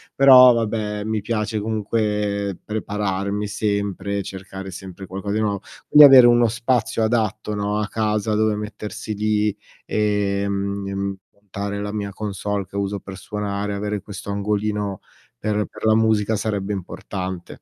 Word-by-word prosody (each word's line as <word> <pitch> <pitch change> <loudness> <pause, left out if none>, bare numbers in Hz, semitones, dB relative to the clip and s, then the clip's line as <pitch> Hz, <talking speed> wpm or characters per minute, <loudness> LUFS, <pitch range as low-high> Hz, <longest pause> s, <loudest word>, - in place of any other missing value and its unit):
però 130 -2 +9
vabbè, 105 -2 -2
mi 110 -1 -1
piace 105 -1 -2
comunque 105 -2 -1
prepararmi 105 -1 -2
sempre, 100 -1 -2
cercare 95 0 -8
sempre 95 +1 -9
qualcosa 100 +2 -4
di - - +1
nuovo. 100 -2 -1 0.3
Quindi 150 0 +9
avere 130 -3 +9
uno 120 0 +5
spazio 115 -1 0
adatto, 110 -2 0
no, 105 +1 -1
a 105 - -1
casa, 110 0 -1
dove 110 0 +2
mettersi 105 0 -6
lì, 105 0 +1 0.3
ehm, 100 -1 -1 0.2
montare 100 0 -5
la 105 0 -3
mia 100 -1 -3
console 100 -1 -3
che - - -16
uso 100 0 -2
per 95 -1 -9
suonare, 100 +1 -3
avere 105 0 -3
questo 100 0 -9
angolino 105 -1 -1 0.4
per 105 -1 0
per - - -8
la 110 0 +5
musica 110 -1 +2
sarebbe 100 -1 -2
importante. 95 -1 -5
105 Hz, 140 wpm, -22 LUFS, 100-110 Hz, 0.4 s, però